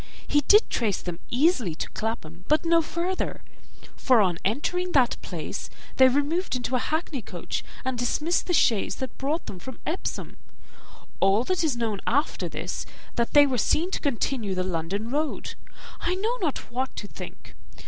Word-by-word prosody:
He 290 - +3
did 420 +8 +6
trace 215 -6 +1
them 175 -2 -5
easily 250 - +2
to - - -4
Clapham, 185 -6 -4
but 305 +2 +3
no 335 0 +5
farther; 345 +4 -2 0.5
for 255 -3 +4
on 180 -5 +2
entering 360 - 0
that 255 -4 +4
place, - - -5 0.3
they 260 - +8
removed 290 +6 +1
into 250 +1 -1
a - - +3
hackney 310 0 -2
coach, 180 -4 -4 0.2
and 260 -2 -1
dismissed 300 +8 +1
the 355 - +1
chaise 225 -8 +3
that 260 -3 -5
brought 295 +5 -1
them 185 - -7
from 260 +6 -8
Epsom. 335 +4 -3 0.8
All 195 +4 +4
that 360 +5 0
is 290 -7 +1
known 220 -4 -1
after 285 +5 +1
this - - -4
is, - - -4 0.3
that 235 -1 0
they 290 -1 +8
were 260 -4 0
seen 335 - +2
to - - -1
continue 235 - -1
the 185 - 0
London 185 +5 -2
road. 300 +2 -1 0.5
I 360 - 0
know 440 +6 0
not 305 -8 -2
what 260 +2 -2
to 205 - -5
think. - - -10
260 Hz, 175 wpm, -26 LUFS, 220-315 Hz, 0.8 s, they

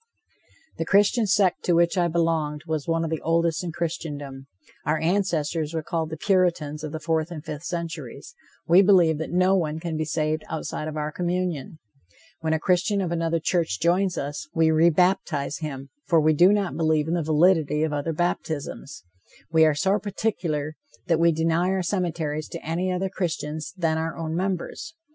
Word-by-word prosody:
The 165 - -1
Christian 205 +5 +3
sect 195 -2 +2
to 175 - +3
which 170 +2 +3
I 175 -2 +2
belonged 160 -3 0
was 155 -3 -3
one 165 0 +1
of 165 - -3
the 160 - -2
oldest 165 +1 +1
in 175 - -3
Christendom. 145 -5 -5 0.4
Our 155 +1 +1
ancestors 165 -2 0
were 160 - -2
called 160 0 -2
the 160 - -6
Puritans 170 -5 +1
of 155 - -4
the 160 - -4
fourth 160 0 -1
and 160 -3 -8
fifth 150 +2 -6
centuries. 170 - -6 0.3
We 175 +3 +7
believe 175 -6 +4
that 160 - -4
no 185 +2 +3
one 160 -4 -1
can 165 -1 -4
be 155 - -1
saved 155 +1 -1
outside 155 -1 -4
of 155 0 -5
our 150 0 -2
communion. 175 -4 -2 0.6
When 160 -1 -1
a 160 - +1
Christian 185 +4 +1
of 180 -3 -1
another 165 -1 0
church 160 - 0
joins 180 +2 +1
us, 145 +2 -4
we 160 -1 +4
re 160 +2 +5
baptize 165 -4 +1
him, 140 -3 -6 0.2
for 170 -3 +4
we 155 0 +4
do 175 +6 +6
not 205 -3 0
believe 155 -2 +1
in 165 - -1
the 175 - +1
validity 155 -1 +3
of 155 -1 -1
other 145 +3 -1
baptisms. 155 - -3 0.5
We 160 -1 +5
are 155 -2 +3
so 190 +7 +1
particular 170 -8 -2 0.3
that 165 -2 +2
we 170 0 +5
deny 165 +3 +1
our 190 -1 0
cemeteries 165 -5 -2
to - - -8
any 175 +4 -1
other 185 +1 -1
Christians 160 -5 -3
than 160 -3 +1
our 165 0 -3
own 160 -1 -3
members. 190 - -3
165 Hz, 185 wpm, -25 LUFS, 155-180 Hz, 0.6 s, We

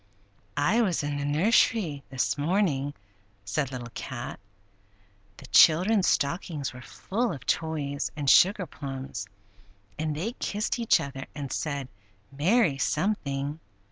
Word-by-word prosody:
"I 180 +12 +3
was 180 -8 +1
in 145 0 -2
the 140 - -2
nursery 160 0 +2
this 130 -2 0
morning," 145 -3 0 0.5
said 135 +7 -1
Little 120 -2 -6
Cat. 125 -1 -6 1.0
"The - - -11
children's 185 +5 +5
stockings 150 -2 -1
were 125 - -10
full 230 - -2
of 140 - -8
toys 150 -3 -1
and 145 -2 -4
sugar 190 +6 +6
plums, 135 - -6 0.7
and 155 -1 -1
they 185 +10 -2
kissed 215 -1 -2
each 230 - +4
other 135 -1 -6
and 140 -3 -5
said, 140 -4 -2 0.4
'Merry'—something! 145 - +1
145 Hz, 120 wpm, -27 LUFS, 140-185 Hz, 1.0 s, sugar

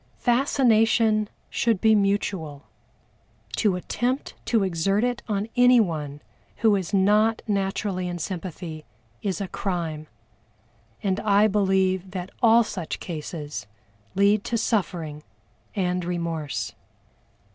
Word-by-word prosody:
Fascination 225 -4 +3 0.2
should 230 -5 +1
be 220 +2 +5
mutual; 195 -8 0 0.9
to 205 -5 +2
attempt 245 +8 -2
to 225 -4 +2
exert 195 +4 +1
it 245 -1 0
on 205 0 -1
anyone 175 - +3 0.3
who 220 -3 +3
is 190 -3 -3
not 210 +3 +3
naturally 195 -2 -1
in 175 0 -4
sympathy 170 -2 -5 0.4
is 190 -4 -2
a 200 - -3
crime, 165 -6 -3 1.0
and 195 -1 0
I 205 0 +4
believe 190 -2 +1
that 185 0 -6
all 230 0 +6
such 180 -6 -5
cases 150 - -6 0.5
lead 200 +1 +3
to 235 - 0
suffering 175 -9 -1 0.5
and 180 -2 0
remorse. 170 -4 -3
195 Hz, 110 wpm, -25 LUFS, 175-215 Hz, 1.0 s, all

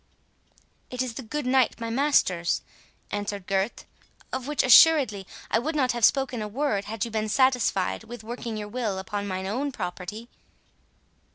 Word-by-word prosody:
"It 250 0 -2
is 250 -2 -5
the 245 - -6
good 290 +5 -4
knight 255 -1 +2
my 230 0 -4
master's," 225 -10 +2 0.5
answered 205 -2 -4
Gurth, 195 +3 -1 0.5
"of 260 0 -3
which, 295 0 +1
assuredly, 255 - +6 0.2
I 225 - +3
would 310 +7 -3
not 260 -4 +2
have 240 -1 -4
spoken 265 -2 +3
a 210 - -3
word, 210 -3 -1
had 215 0 -3
you 230 - -7
been 215 0 -1
satisfied 245 -5 +1
with 240 0 -9
working 230 0 -5
your 210 -1 -5
will 215 -3 -2
upon 200 +2 -4
mine 190 -1 -3
own 260 +9 -2
property." 210 +2 -6
225 Hz, 165 wpm, -26 LUFS, 205-260 Hz, 0.5 s, assuredly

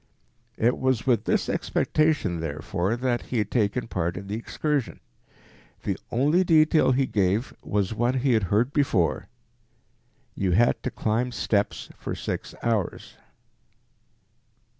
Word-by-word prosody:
It 120 +3 +2
was 130 -3 +1
with 120 -5 +2
this - - +1
expectation, 155 - 0
therefore, 85 +6 -2
that 120 -1 -1
he 125 - -2
had 105 -2 -1
taken 115 +1 0
part 90 -4 -2
in 100 - -6
the 100 +2 -4
excursion. 140 +4 -2 0.8
The - - -1
only 150 +9 +3
detail 155 -4 +4
he 135 +1 +2
gave 105 +1 0
was 100 -1 -1
one 120 +4 +1
he 130 0 +2
had 110 - +3
heard 115 +7 +2
before, 100 - +1 1.1
"you 95 -2 0
had 120 +6 +3
to - - -2
climb 115 +3 -1
steps 105 -3 -1
for - - -4
six - - -5
hours." 110 -6 -2
115 Hz, 135 wpm, -25 LUFS, 100-130 Hz, 1.1 s, detail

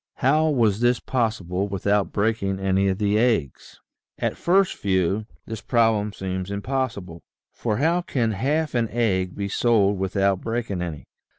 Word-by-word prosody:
How 155 +4 +2
was 115 -8 +2
this 120 0 +2
possible 100 -6 -1
without 100 +1 0
breaking 100 -2 0
any 95 0 +1
of 95 -1 0
the 105 0 +1
eggs? 110 - -1 0.4
At - - -1
first 190 +2 +2
view, 95 +2 0 0.2
this 110 0 -6
problem 110 -3 +2
seems 95 -1 -4
impossible, 100 -5 -3 0.3
for 110 -3 -2
how 165 +6 +2
can 120 -9 -1
half 145 +9 -1
an 115 -3 0
egg 95 -5 0
be 100 -1 -3
sold 100 -2 +2
without 95 0 +1
breaking 115 -5 -3
any 80 -6 -5
105 Hz, 150 wpm, -24 LUFS, 95-120 Hz, 0.4 s, How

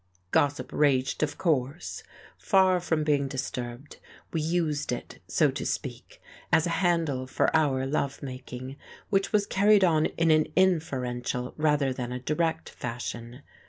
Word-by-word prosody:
Gossip 145 0 +1
raged, 135 -3 +2
of 155 - -1
course. 150 -1 -1 0.3
Far 190 -2 +3
from 160 -3 0
being 145 -2 +1
disturbed, 130 0 -5 0.4
we 165 - 0
used 155 -3 0
it, 125 - -6
so - - +3
to - - -5
speak, - - -5 0.3
as 160 0 +4
a 170 - -1
handle 165 -8 +1
for 135 - +1
our 135 -4 +2
love 140 0 -2
making, 130 0 -7 0.3
which 195 -1 +1
was 205 -2 +3
carried 200 0 +4
on 160 -4 +4
in 165 -1 +1
an 155 0 +4
inferential 125 -9 0
rather 150 -3 +2
than 125 -1 -5
a 125 - -3
direct 160 +5 -1
fashion. 120 +2 -6
145 Hz, 145 wpm, -27 LUFS, 130-165 Hz, 0.4 s, as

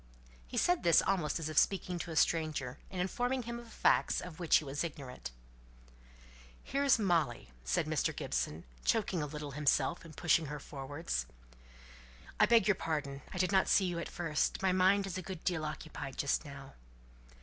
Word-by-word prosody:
He - - -6
said 355 -1 +3
this 170 - +5
almost 175 -7 0
as 165 -2 -3
if 155 - +4
speaking 185 -2 0
to 170 - -5
a 160 - -5
stranger, 155 -5 +1
and 185 - -6
informing 245 +8 -1
him 235 +1 -5
of 235 -1 -13
facts - - +2
of 180 -2 -8
which 170 -3 +3
he - - +4
was 145 +2 -3
ignorant. 140 - -6 1.3
"Here's 275 -1 +3
Molly," 165 - 0
said 65 - 0
Mr. - - 0
Gibson, 75 +7 -2 0.2
choking 200 -6 +1
a 150 - -2
little 150 0 -6
himself, 145 +2 +1
and 160 -2 -13
pushing 165 -2 +3
her 150 +1 -5
forwards. 140 - -4 1.1
"I - - +6
beg 230 -4 +5
your 210 - +6
pardon; 145 -5 -3
I - - -6
did 185 0 +1
not 190 -1 +4
see 195 - +4
you 175 -2 -2
at - - -5
first. 160 -3 -1
My 190 - +4
mind 190 +2 +4
is 185 -1 -4
a - - -4
good 185 -2 -7
deal 175 -4 0
occupied 150 -3 -6
just 140 +3 0
now." 140 -1 -10
165 Hz, 180 wpm, -33 LUFS, 145-190 Hz, 1.3 s, I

